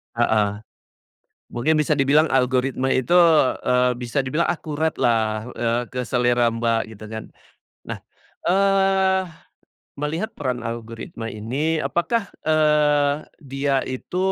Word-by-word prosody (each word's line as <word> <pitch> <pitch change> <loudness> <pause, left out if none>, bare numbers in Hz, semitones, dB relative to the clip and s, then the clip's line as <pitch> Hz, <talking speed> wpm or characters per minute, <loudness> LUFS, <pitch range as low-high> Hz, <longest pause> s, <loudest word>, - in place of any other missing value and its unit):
Heeh. 105 -3 +1 0.9
Mungkin 150 +7 +1
bisa 150 -1 +1
dibilang 145 +4 +3
algoritma 130 +1 +1
itu, 130 +7 +1 0.5
eee, 125 0 +3
bisa 125 +3 -1
dibilang 150 +6 0
akurat 160 -1 -2
lah, 110 -1 +1
eee, 120 +1 0
ke 125 - -3
selera 120 -1 +2
Mbak 115 -1 -1
gitu 110 - -12
kan. 110 0 -6 0.7
Nah, - - -3 0.5
eee, 195 0 +3 0.7
melihat 160 +9 -3
peran 130 -4 -2
algoritma 115 0 -6
ini, 135 +10 -2
apakah, 200 +7 -1 0.2
eee, 150 -2 +3 0.2
dia 135 -1 -1
itu 130 +7 -5
135 Hz, 115 wpm, -22 LUFS, 120-155 Hz, 0.9 s, dibilang